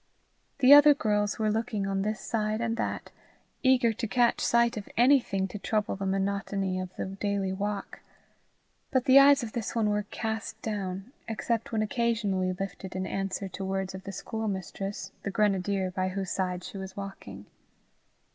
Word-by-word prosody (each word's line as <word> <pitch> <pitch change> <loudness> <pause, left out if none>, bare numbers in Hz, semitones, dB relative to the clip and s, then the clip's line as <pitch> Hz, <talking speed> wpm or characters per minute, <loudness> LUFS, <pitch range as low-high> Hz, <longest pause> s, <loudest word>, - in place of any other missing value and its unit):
The 265 +2 +9
other 290 0 +9
girls 210 -4 0
were 215 -1 +1
looking 220 -2 -1
on 195 0 -1
this 215 +2 -2
side 215 -1 -1
and 230 -1 -1
that, - - -3 0.5
eager 255 -3 +4
to 225 +1 -3
catch 240 +2 +2
sight 235 0 +3
of 210 -2 -6
anything 235 -6 +3
to 210 - -7
trouble 210 0 -1
the 195 0 -3
monotony 195 -1 -1
of 185 0 -4
the - - -3
daily 195 0 -2
walk; 205 +1 -4 0.9
but 260 -2 +1
the 265 +1 +8
eyes 280 -1 +6
of 225 - -5
this 235 -1 -4
one 215 -2 +2
were 210 0 -1
cast 220 0 -4
down, 195 0 -4 0.2
except 225 0 -2
when 220 -2 +1
occasionally 210 -5 0
lifted 190 0 -6
in 185 0 -2
answer 195 +1 -3
to 190 +1 -6
words 190 0 -2
of 190 0 -8
the 195 - -5
schoolmistress, 195 -1 -4
the - - -3
grenadier, 195 -2 +1
by 185 0 -1
whose 190 0 -3
side 180 -1 -2
she 195 - -7
was 190 0 -8
walking. 105 - -8
205 Hz, 170 wpm, -28 LUFS, 190-225 Hz, 0.9 s, The